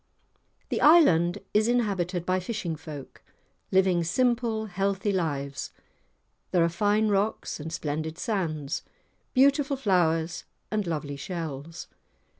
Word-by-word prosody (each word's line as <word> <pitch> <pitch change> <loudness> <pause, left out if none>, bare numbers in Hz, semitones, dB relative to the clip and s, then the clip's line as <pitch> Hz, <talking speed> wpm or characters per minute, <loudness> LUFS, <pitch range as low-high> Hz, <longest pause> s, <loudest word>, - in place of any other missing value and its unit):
The - - -1
island 180 - +6 0.2
is 215 +1 +3
inhabited 195 -7 0
by 185 +1 +1
fishing 185 -3 -3
folk, 150 -3 -10 0.5
living 185 -2 +3
simple 230 +3 +1
healthy 195 +1 -1
lives. 140 -7 -2 0.8
There 175 -2 +3
are 170 - +3
fine 210 +4 +2
rocks 205 -1 -1
and 160 +2 -6
splendid 160 0 -3
sands; 165 - -2 0.5
beautiful 275 +1 +4
flowers 170 -7 +1 0.3
and 210 -3 -1
lovely 145 -3 -3
shells. 160 -1 -6
180 Hz, 110 wpm, -27 LUFS, 160-215 Hz, 0.8 s, island